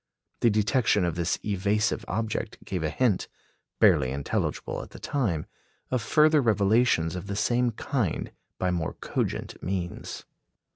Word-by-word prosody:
The 120 - +4
detection 105 -1 +2
of 85 - 0
this 85 0 0
evasive 105 +2 +1
object 110 +2 -2
gave 90 -3 -3
a 80 - 0
hint, 120 -3 +1 0.5
barely 65 - +5
intelligible 70 +1 -2
at - - -10
the - - -11
time, 110 - -1 0.5
of 130 -2 +1
further 155 +5 +4
revelations 105 -6 +3
of 90 +2 -6
the 100 - -3
same 120 +3 +2
kind 115 - -2 0.3
by 90 -1 0
more 85 -3 -1
cogent - - -3
means. 90 -2 -4
105 Hz, 140 wpm, -27 LUFS, 90-120 Hz, 0.5 s, barely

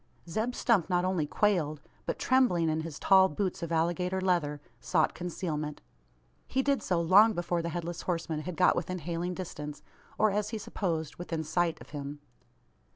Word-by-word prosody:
Zeb 220 +8 -2
Stump 205 -8 +2
not 180 0 +2
only 180 -5 0
quailed; 165 -6 +1 0.3
but, - - -1
trembling 240 -11 +3
in 155 0 0
his 160 -2 -6
tall 190 -1 +5
boots 185 +5 -2
of 170 -1 -4
alligator 175 +3 +1
leather, 170 -6 +1 0.2
sought 160 -4 +1
concealment. 155 -4 -4 0.7
He 265 +1 0
did 280 0 +1
so, 180 -2 0
long 200 +7 +6
before 175 -2 -1
the 170 - -3
Headless 170 +1 -4
Horseman 165 -3 -2
had 165 +1 -6
got 180 - +5
within 180 +2 -2
hailing 175 +2 -3
distance; 150 -5 -6 0.3
or, 215 0 +4
as 210 +1 -1
he 225 - -3
supposed, 165 -7 -3
within 165 -2 -3
sight 165 +1 0
of - - -14
him. 145 0 -6
175 Hz, 170 wpm, -30 LUFS, 160-190 Hz, 0.7 s, long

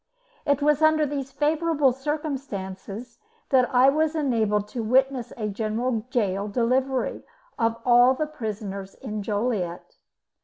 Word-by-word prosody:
It 285 0 +2
was 300 0 +3
under 310 -1 +4
these 280 -2 -4
favourable 300 -1 +2
circumstancesthat 265 - -3
I 255 +1 +6
was 310 +2 +1
enabled 220 -8 +1
to 235 - -4
witness 255 +2 +1
a 215 -2 -2
General 220 +3 -2
Gaol 200 -5 0
Delivery 255 +4 0 0.4
of 230 0 +1
all 245 +1 +6
the 310 - -1
prisoners 205 -8 -6
in 215 0 -5
Joliet. 205 - -2
250 Hz, 120 wpm, -25 LUFS, 215-285 Hz, 0.4 s, I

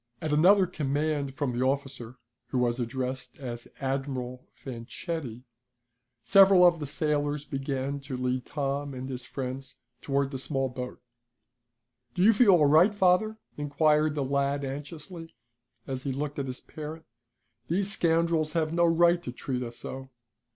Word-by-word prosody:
At 155 -1 -2
another 185 +6 +6
command 145 -3 -1
from 135 -2 -1
the 120 +2 0
officer, 135 -3 -2 0.3
who - - -2
was 120 0 +1
addressed 125 +1 -4
as 120 -3 -6
Admiral 130 -2 -3
Fanchetti, 130 0 -6 0.8
several 195 -2 +7
of 175 -2 +5
the 145 - -4
sailors 145 0 -1
began 135 0 -3
to 135 -2 -6
lead 125 0 -1
Tom 140 -1 -2
and 130 +1 -5
his 125 -2 -6
friends 135 +1 -6 0.3
toward 140 0 0
the 135 - -4
small 135 -1 -1
boat. 125 0 -6 1.2
"Do 180 - +2
you 225 +3 +7
feel 220 +1 +5
all 160 -4 +5
right, 165 +9 +5
father?" 205 +3 +3 0.2
inquired 150 +1 +2
the 145 - 0
lad 140 +1 0
anxiously, 155 +4 -7 0.5
as 130 -1 -4
he 135 - -2
looked 145 +2 -3
at 135 - -2
his 130 0 -6
parent. 155 +1 -8 0.6
"These 190 +5 0
scoundrels 165 -3 +1
have 160 -1 0
no 170 0 +4
right 170 +1 +4
to 125 - -5
treat 125 0 -4
us 120 -1 -6
so." 130 0 -7
140 Hz, 150 wpm, -28 LUFS, 130-160 Hz, 1.2 s, several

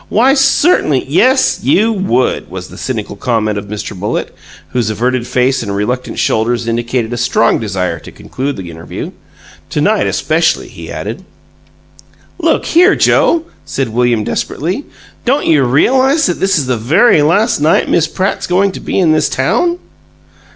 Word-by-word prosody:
Why, 255 +5 +3
CERTAINLY 270 - +2
'" - - -20
"Yes, 255 - +3
you 225 +3 +2
would!" 160 - 0
was - - -7
the - - -12
cynical - - -4
comment 110 -3 -1
of 100 - -10
Mr. 105 0 -6
Bullitt, 100 +3 -3 0.4
whose 120 -3 -1
averted 120 +3 -1
face 130 +2 +1
and 100 -3 -4
reluctant 125 +5 -3
shoulders 115 +1 0
indicated 120 0 -2
a - - -3
strong 115 -1 +2
desire 95 -4 -3
to - - -12
conclude 140 +2 -5
the 90 -3 -7
interview. 80 +1 -7 0.6
"To - - -2
night, - - +2
especially!" 165 +1 0
he - - -10
added. - - -6 1.2
"Look 330 -1 +1
here, 360 +4 +4
Joe," 335 -1 +3 0.2
said 135 -3 -3
William, 120 -1 +1
desperately, 180 - -3 0.4
"don't 275 +4 +1
you 150 -4 +3
realize 260 - +3
that 175 - -1
this 190 -1 +2
is 145 - 0
the 125 -1 -1
very 155 - +3
last 175 +9 +2
night 155 +3 +2
Miss 165 -2 +2
Pratt's 190 +4 -2
going 190 +2 +2
to - - -8
be - - -3
in 175 -5 +3
this 155 -1 +2
town?" 240 - 0
140 Hz, 165 wpm, -14 LUFS, -, 1.2 s, here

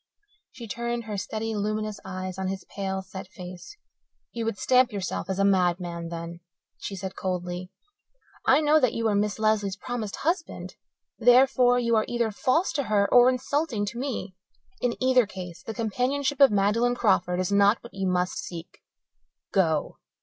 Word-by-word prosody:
She 235 - -9
turned 235 +2 -3
her 215 -2 -5
steady 220 +3 -3
luminous 215 0 -2
eyes 185 0 -5
on 190 - -2
his 190 0 -4
pale, 190 -1 -2
set 190 0 -9
face. 180 - -10 0.5
"You 230 -1 -4
would 225 -3 -2
stamp 255 +2 +3
yourself 195 -2 -4
as 190 - -1
a 195 - +3
madman, 175 -3 +1
then," 170 0 -6 0.4
she 200 - -5
said 190 0 -6
coldly. 180 -1 -4 0.7
"I 270 +4 +4
know 305 +1 +4
that 255 -5 +2
you 230 -1 0
are - - +1
Miss 205 0 0
Lesley's 215 -3 +1
promised 230 -5 -5
husband. 330 +2 -3 0.4
Therefore, 245 +1 +5
you 235 -1 +2
are 215 - +2
either 235 -2 0
false 260 - +1
to 280 -3 -1
her 205 -1 +2
or 245 0 +8
insulting 255 -3 -1
to 235 +4 -5
me. 245 -8 -4 0.5
In 245 -1 0
either 255 -3 +4
case 180 -4 -8
the - - -6
companionship 260 +5 -1
of 275 - +9
Magdalen 210 +4 +2
Crawford 185 -6 +2
is 185 +1 -1
not 200 +2 +5
what 235 - -12
you 195 -1 -2
must 180 0 0
seek. 175 -2 -8 0.7
Go!" 160 -6 +1
210 Hz, 170 wpm, -26 LUFS, 190-245 Hz, 0.7 s, of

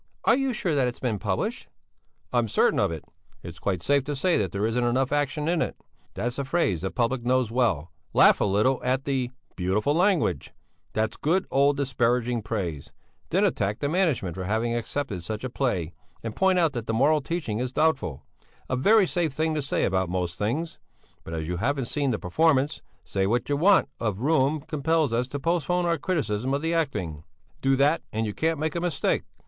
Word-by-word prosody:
"Are 230 - +6
you 270 0 0
sure 185 -8 -1
that 135 -3 +2
it 120 - -3
has - - -16
been 115 -5 -1
published?" 95 -3 -2 0.7
"I 120 - +4
am 115 - 0
certain - - +2
of - - +2
it. 80 -2 -6 0.4
It's 85 0 -9
quite 95 -4 -2
safe 140 -1 +3
to 145 - -3
say 175 +6 +2
that 95 -5 0
there 100 +2 -1
isn't 115 +2 0
enough 125 +2 +1
action 145 +1 0
in 170 0 +1
it; - - -2 0.4
that's 120 +3 -3
a - - 0
phrase 135 - 0
the 95 - -2
public 120 +2 -1
knows 125 -2 +1
well; 100 - 0 0.2
laugh - - +5
a - - +3
little 105 +7 +2
at 130 +2 0
the 130 -3 0 0.3
'beautiful 95 +9 +1
language'; 175 - +1 0.4
that's 110 0 -1
good, 180 +6 +1
old, 140 +1 +3
disparaging 125 -3 +1
praise; 95 -9 -4 0.4
then - - +3
attack 100 +2 0
the 145 - -2
management 155 - +1
for 95 +2 -5
having 110 +4 0
accepted 120 -5 -3
such 110 +6 -5
a 130 - -4
play 95 - -1 0.3
and 115 -1 -5
point 190 -1 +3
out 165 -4 +2
that 120 -3 -5
the 115 - 0
moral 150 +5 +3
teaching 140 -8 -3
is 125 0 -2
doubtful 135 - 0 0.4
a 130 - -1
very 205 - +5
safe 170 -3 0
thing 160 +2 0
to 150 - -1
say 135 - 0
about 95 -1 0
most 90 -1 -2
things. 125 - -2 0.4
But 80 - -6
as 80 -1 -3
you 90 +1 -2
haven't 135 +6 0
seen 140 +2 -1
the 115 - 0
performance, 145 - +1 0.2
say 95 -1 -1
that 120 +6 0
want 190 +6 +4
of 110 -3 -2
room 150 0 +2
compels 155 -1 0
us 120 +2 0
to 140 +2 -5
postpone 175 +3 0
our 170 -2 +1
criticism 135 - -1
of 145 - -3
the 165 +1 0
acting. 105 - -2 0.4
Do 135 0 +3
that, 145 +4 +3
and 110 +1 -1
you 105 - -3
can't 160 +5 0
make 155 0 -1
a 170 - -2
mistake." 175 -2 0
130 Hz, 205 wpm, -26 LUFS, 105-155 Hz, 0.7 s, Are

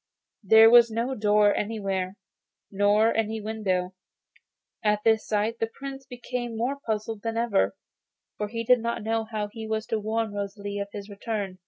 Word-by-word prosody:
There 220 +2 +7
was 235 -1 +8
no 230 +4 -2
door 210 -2 +3
anywhere, 195 -3 -2 0.5
nor 205 +3 +3
any 220 0 -1
window. 195 -4 -2 0.9
At 210 -1 +1
this 220 -1 +2
sight 215 +2 0
the 225 - 0
Prince 270 0 -8
became 245 -2 -5
more 260 +5 -1
puzzled 220 -1 -3
than 225 +1 -3
ever, 205 - +1 0.6
for 210 - -3
he 230 +2 -4
did 250 +2 +5
not 235 -1 -3
know 225 0 -1
how 215 -2 -4
he 220 +1 -8
was 220 0 -2
to 225 - -1
warn 220 0 -2
Rosalie 200 0 -4
of 200 - -3
his 205 -1 -7
return. 200 -2 -4
220 Hz, 165 wpm, -26 LUFS, 205-230 Hz, 0.9 s, was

